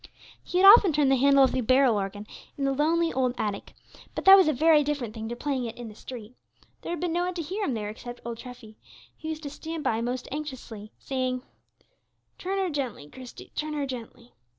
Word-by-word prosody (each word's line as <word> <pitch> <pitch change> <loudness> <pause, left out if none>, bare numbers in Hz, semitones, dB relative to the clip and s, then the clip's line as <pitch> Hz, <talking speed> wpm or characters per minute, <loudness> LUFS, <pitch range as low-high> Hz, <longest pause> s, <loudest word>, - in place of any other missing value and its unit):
He 360 - -3
had 375 - +5
often 400 -2 +9
turned 285 -2 +3
the - - +5
handle 275 +1 +5
of 265 - +3
the 260 - -1
barrel 255 0 +4
organ 205 +1 -4 0.3
in 280 - -3
the 275 0 +1
lonely 330 +4 +1
old 255 -1 0
attic, 205 -2 -4 0.4
but - - -4
that 385 - +10
was 380 -4 +5
a - - +4
very 305 +2 +4
different 275 -7 -3
thing 220 -1 -6
to 240 - -4
playing 265 -1 -2
it 230 - -7
in 240 -2 -7
the - - -11
street. 230 0 -10 0.5
There - - -6
had 345 - -4
been 345 -1 -2
no 350 +1 0
one 365 0 -4
to 345 - -3
hear 385 +7 -4
him 255 - -1
there 210 -2 -4
except 240 +3 -9
old 235 -1 -5
Treffy, 245 -4 -11 0.4
who - - -6
used 315 0 -5
to 285 - -6
stand 320 +1 -6
by 225 0 0
most 245 +1 -3
anxiously, 260 -8 -7
saying, 255 -1 -3 1.0
"Turn 385 +2 -3
her 380 -3 0
gently, 255 - -4
Christie; 255 -2 -12
turn 305 0 -3
her 290 -1 -1
gently." 245 -2 -9
265 Hz, 225 wpm, -26 LUFS, 240-310 Hz, 1.0 s, that